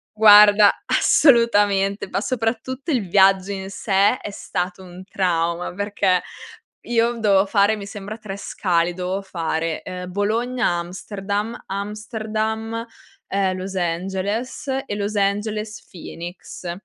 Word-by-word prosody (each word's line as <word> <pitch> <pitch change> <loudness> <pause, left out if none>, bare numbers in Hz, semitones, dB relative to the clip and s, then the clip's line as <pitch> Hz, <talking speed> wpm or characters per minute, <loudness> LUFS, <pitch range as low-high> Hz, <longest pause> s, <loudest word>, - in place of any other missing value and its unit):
Guarda 210 -1 +8
assolutamente, 205 -7 +3
ma 195 - -2
soprattutto 255 +5 -2
il 235 -9 0
viaggio 195 0 +4
in 195 0 -5
sé 200 +4 +2
è - - -5
stato 185 -2 -4
un 180 0 -11
trauma. 170 -2 -1
Perché 200 -2 +1 0.6
io 235 0 +1
dovevo 200 -2 +3
fare 205 +1 +3
mi 200 -2 -8
sembra 205 +2 -7
3 200 -2 -7
scali. 175 -3 0
Dovevo 185 +2 -3
fare 165 -3 -3
ehm, 180 0 -7
Bologna 230 +6 0
Amsterdam, 200 +5 -3
Amsterdam 220 +2 -3 0.4
ehm, 190 -1 0
Los 190 +1 -6
Angeles 190 - -2 0.2
e 205 - -4
Los 205 +1 -3
Angeles 210 +2 -1
Phoenix. 175 0 -8
200 Hz, 120 wpm, -21 LUFS, 185-215 Hz, 0.6 s, Guarda